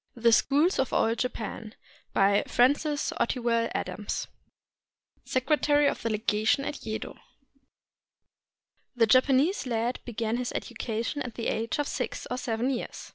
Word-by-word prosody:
THE 235 Hz, -1 st, +3 dB
SCHOOLS 295 Hz, -, +3 dB
OF 265 Hz, -, 0 dB
OLD 225 Hz, +1 st, +2 dB
JAPAN 225 Hz, -3 st, -4 dB, 0.4 s
BY 200 Hz, +1 st, +3 dB
FRANCIS 290 Hz, +4 st, +2 dB
OTTIWELL 235 Hz, -1 st, +1 dB
ADAMS, 210 Hz, -, -3 dB, 1.0 s
SECRETARY 290 Hz, +2 st, +2 dB
OF -, -, 0 dB
THE 230 Hz, -, -1 dB
LEGATION 220 Hz, +4 st, +1 dB
AT 295 Hz, -, -5 dB
YEDO 220 Hz, 0 st, -5 dB, 1.8 s
The 235 Hz, -2 st, +4 dB
Japanese 265 Hz, -, +3 dB
lad 235 Hz, +1 st, -1 dB
began 230 Hz, -1 st, -2 dB
his 250 Hz, -1 st, -3 dB
education 230 Hz, +5 st, -3 dB
at 240 Hz, -4 st, -5 dB
the 230 Hz, -, -4 dB
age 225 Hz, +1 st, -2 dB
of 290 Hz, -1 st, -1 dB
six -, -, -3 dB
or 250 Hz, -, -1 dB
seven 235 Hz, +2 st, -1 dB
years. 250 Hz, -, -5 dB
240 Hz, 130 wpm, -28 LUFS, 225-275 Hz, 1.8 s, The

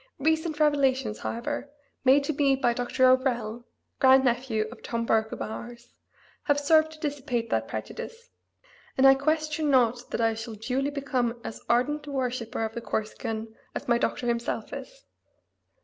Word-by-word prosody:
Recent 315 Hz, +1 st, 0 dB
revelations, 270 Hz, -7 st, +2 dB
however, 285 Hz, +5 st, -4 dB, 0.3 s
made 270 Hz, +2 st, +5 dB
to 310 Hz, -, -1 dB
me 275 Hz, -1 st, +3 dB
by 255 Hz, -3 st, +1 dB
Dr. 245 Hz, +2 st, +1 dB
O'Rell 240 Hz, -3 st, +1 dB, 0.3 s
(grandnephew 255 Hz, -4 st, +4 dB
of 240 Hz, -, -12 dB
"Tom 230 Hz, -1 st, -3 dB
Burke 220 Hz, -1 st, +2 dB
of -, -, -4 dB
Ours"), 235 Hz, +2 st, -8 dB, 0.5 s
have 290 Hz, -3 st, +3 dB
served 315 Hz, +2 st, +4 dB
to 310 Hz, -, -14 dB
dissipate 270 Hz, -6 st, -2 dB
that 110 Hz, 0 st, 0 dB
prejudice, 465 Hz, -, -7 dB, 0.7 s
and 265 Hz, -, +5 dB
I 270 Hz, -, +10 dB
question 310 Hz, +2 st, 0 dB
not 245 Hz, -2 st, +2 dB
that -, -, -3 dB
I 225 Hz, -1 st, +2 dB
shall 225 Hz, 0 st, -6 dB
duly 255 Hz, +6 st, -1 dB
become 255 Hz, -4 st, -1 dB
as -, -, -7 dB
ardent 295 Hz, +5 st, +1 dB
a -, -, -5 dB
worshipper 250 Hz, -4 st, -2 dB
of 220 Hz, -, -5 dB
the 235 Hz, -, -5 dB
Corsican 220 Hz, +1 st, -4 dB, 0.2 s
as -, -, -5 dB
my 235 Hz, -1 st, +3 dB
doctor 245 Hz, -, -1 dB
himself 235 Hz, 0 st, -2 dB
is. -, -, -9 dB
255 Hz, 160 wpm, -27 LUFS, 235-285 Hz, 0.7 s, I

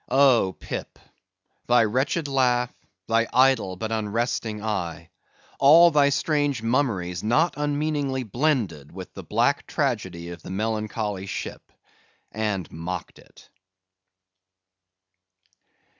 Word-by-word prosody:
Oh, 130 Hz, -8 st, +4 dB
Pip! -, -, -6 dB, 0.7 s
thy 120 Hz, -1 st, +5 dB
wretched 130 Hz, +8 st, 0 dB
laugh, 125 Hz, -3 st, +1 dB, 0.3 s
thy 115 Hz, 0 st, +2 dB
idle 130 Hz, -7 st, +3 dB
but 110 Hz, +4 st, -5 dB
unresting 110 Hz, 0 st, -2 dB
eye; 85 Hz, -6 st, -3 dB, 0.5 s
all 165 Hz, +5 st, +7 dB
thy 145 Hz, -2 st, +4 dB
strange 145 Hz, -4 st, 0 dB
mummeries 115 Hz, -8 st, 0 dB
not 150 Hz, +11 st, +2 dB
unmeaningly 145 Hz, -2 st, -1 dB
blended 110 Hz, -, -1 dB
with 95 Hz, +1 st, -9 dB
the 95 Hz, -, -8 dB
black 115 Hz, -, 0 dB
tragedy 95 Hz, -, -2 dB
of 85 Hz, -1 st, -9 dB
the -, -, -10 dB
melancholy 105 Hz, -1 st, -3 dB
ship, -, -, -6 dB, 0.6 s
and 105 Hz, -6 st, -2 dB
mocked 85 Hz, +2 st, -6 dB
it! -, -, -19 dB
115 Hz, 105 wpm, -24 LUFS, 95-135 Hz, 0.7 s, all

